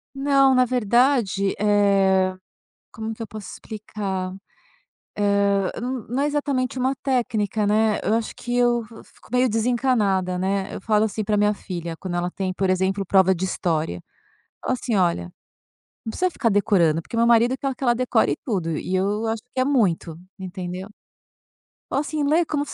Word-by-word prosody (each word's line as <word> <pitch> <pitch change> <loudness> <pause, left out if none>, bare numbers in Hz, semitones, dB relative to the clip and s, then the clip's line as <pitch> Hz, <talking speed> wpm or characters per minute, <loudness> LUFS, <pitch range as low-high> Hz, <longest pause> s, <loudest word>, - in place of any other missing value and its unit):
Não, 275 -1 +4
na 255 0 +5
verdade, 240 -4 +2
eh, 195 -2 +3 0.6
como 220 +1 -5
que 225 - -8
eu - - -5
posso 215 -2 -8
explicar? 195 -3 -5 0.8
Hã, 200 -1 +2
n 250 -1 -4
não 260 - 0
é - - +2
exatamente 280 -4 -1
uma 260 +1 +1
técnica, 220 -5 0
né, 215 +1 +2
eu 215 - +1
acho 225 0 -2
que 245 - -4
eu 240 -1 +3
vo 225 0 -13
fico - - -22
meio 250 +1 +3
desencanada, 220 -5 +1
né, 195 +1 -1
eu - - -6
falo 215 0 +2
assim 215 0 -3
para 210 0 +1
minha 210 0 +3
filha 170 -4 -6
quando 175 0 -5
ela 175 0 -1
tem, 190 0 -3
por 190 +1 -1
exemplo, 190 +1 0
prova 190 0 +4
de 185 +1 -3
história. 160 - -2 0.6
Falo - - -1
assim: 235 - -1
"Olha, 175 - +1 0.8
não 225 - -3
precisa 365 +10 0
ficar 265 -8 0
decorando", 190 -6 +2
porque 230 - -7
meu 230 0 +3
marido 235 +2 +4
quer 270 0 -2
que 275 - -5
ela 240 -1 +4
decore 250 +1 +2
tudo 180 - -1
e 185 - -2
eu 205 +4 0
acho 225 0 -2
que 255 - 0
é - - +3
muito, 185 - +1 0.2
entendeu. 185 0 -6 1.0
Ou - - -1
assim: 300 +1 -2
"Lê 315 +4 +3
como 295 -2 -1
se - - -8
210 Hz, 175 wpm, -23 LUFS, 190-245 Hz, 1.0 s, na